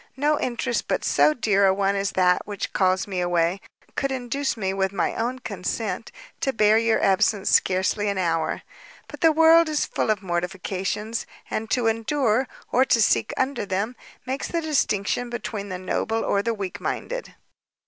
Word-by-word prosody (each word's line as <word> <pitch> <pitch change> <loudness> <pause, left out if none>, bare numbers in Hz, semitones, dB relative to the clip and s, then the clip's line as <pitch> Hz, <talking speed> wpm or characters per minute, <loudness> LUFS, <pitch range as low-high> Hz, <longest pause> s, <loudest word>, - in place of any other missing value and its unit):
no 295 +2 +2
interest 240 -1 -2
but - - -1
so - - +4
dear 205 -8 +2
a - - +5
one 200 0 +1
as 195 0 -1
that 180 -1 +3
which 205 -2 -5
calls 185 -1 +2
me 190 -3 -3
away, 175 +1 +1 0.3
should 275 - -1
induce 265 +1 -2
me, 190 -3 -1
with 190 -1 0
my 195 -3 -1
own 240 +3 -2
consent, 255 - -4 0.3
to 270 - 0
bear 215 -3 +4
your 230 -1 +2
absence 195 +1 +2
scarcely 190 +3 +2
an 200 - -2
hour; 165 -3 -1 0.4
but - - -11
the 325 -2 +6
world 325 +1 +6
is 305 -1 0
full - - -2
of 210 -2 0
mortifications, 190 +4 -3 0.2
and 220 0 -3
to 245 -2 +1
endure, 225 +2 +1 0.2
or 255 - +4
to 245 - +2
sink 220 - +2
under 260 -2 0
them, 200 +5 -2 0.3
makes 265 +2 -3
all 335 - 0
the 325 - -5
distinction 245 -5 0
between 215 -3 -5
the 185 - -4
noble 220 +4 -1
or 200 - +1
the 230 +2 -1
weak 195 -3 -5
minded. - - -4
215 Hz, 180 wpm, -24 LUFS, 190-255 Hz, 0.4 s, the